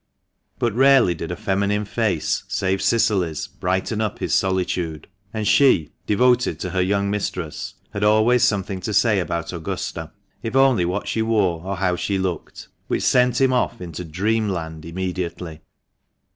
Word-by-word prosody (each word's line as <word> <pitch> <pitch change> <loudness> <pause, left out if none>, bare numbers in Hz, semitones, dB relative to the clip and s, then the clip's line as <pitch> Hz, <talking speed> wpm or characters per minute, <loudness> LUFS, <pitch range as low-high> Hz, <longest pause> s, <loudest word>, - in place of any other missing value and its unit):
But 120 -3 0
rarely 135 -6 +5
did 80 -1 -6
a - - -2
feminine 105 0 0
face 100 -4 0
save 95 -1 -1
Cicily's 95 -9 +1
brighten 95 +4 -2
up 110 -3 -2
his - - -2
solitude, 90 -4 -1 0.2
and 110 -2 -3
she, 130 - +4 0.2
devoted 125 -5 +2
to 90 - -3
her 95 0 +1
young 100 +2 +1
mistress, 90 -6 -4 0.2
had 100 0 -3
always 110 +4 +4
something 95 -2 0
to 105 +3 -3
say 105 -3 +4
about 85 -1 -3
Augusta, 85 -2 -5 0.3
if 115 +3 -4
only 135 -9 +4
what 90 +4 -2
she 110 - -1
wore 100 -7 +1
or 95 +1 -3
how 90 -1 +1
she 100 +2 -1
looked, 95 -4 -4 0.2
which - - -1
sent 125 -1 +3
him 130 -1 +3
off 125 - 0
into 90 -1 -6
dreamland 90 -3 -2
immediately. 90 -2 -4
95 Hz, 155 wpm, -22 LUFS, 90-110 Hz, 0.3 s, rarely